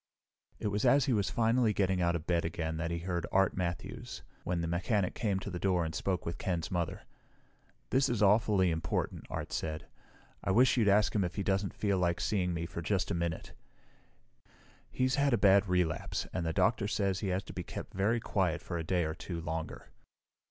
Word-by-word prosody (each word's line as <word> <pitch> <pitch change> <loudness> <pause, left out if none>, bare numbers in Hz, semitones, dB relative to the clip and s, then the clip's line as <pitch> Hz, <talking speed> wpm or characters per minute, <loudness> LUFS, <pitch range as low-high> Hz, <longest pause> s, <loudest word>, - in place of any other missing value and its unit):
It 105 - -2
was 105 +1 -1
as 140 -2 +5
he 130 - +1
was 100 -3 +1
finally 115 -1 +2
getting 95 -2 +1
out 85 0 +2
of 80 -2 -4
bed 85 -2 +1
again 80 -1 -3
that 80 0 -2
he 85 - -2
heard 85 0 -3
Art 95 0 +3
Matthews, 85 -2 -4 0.2
when 90 -1 -1
the 85 - -2
mechanic 90 +3 0
came 100 -4 0
to 100 - -5
the 90 - -4
door 90 -3 +1
and 80 - -4
spoke 90 +2 -2
with 85 - -4
Ken's 85 0 -2
mother. 85 -3 -2 0.9
"This 135 0 +3
is 115 -3 +1
awfully 100 -3 +4
important," 80 0 -2
Art - - -5
said. 80 -1 -3 0.6
"I - - -2
wish 120 +7 +5
you'd 115 -4 +2
ask 105 +1 +4
him 105 - +2
if 90 0 -3
he 100 - -1
doesn't 95 0 0
feel 100 -3 0
like 85 -1 +1
seeing 90 -4 0
me 85 -1 -2
for 85 - -6
just 95 +1 0
a - - +1
minute." 85 -1 -3 1.4
"He's 130 +1 0
had 140 -2 +3
a - - +4
bad 100 0 +5
relapse, 90 -4 0
and 85 -3 -2
the - - 0
doctor 100 +4 +2
says 100 -3 0
he 105 - -3
has 95 +1 -1
to - - -10
be - - -4
kept - - -7
very 105 +5 +1
quiet 95 -6 0
for 85 - -4
a - - -3
day 90 +1 +1
or 80 - -2
two 85 +1 -6
longer." 80 0 -5
95 Hz, 210 wpm, -32 LUFS, 85-105 Hz, 1.4 s, as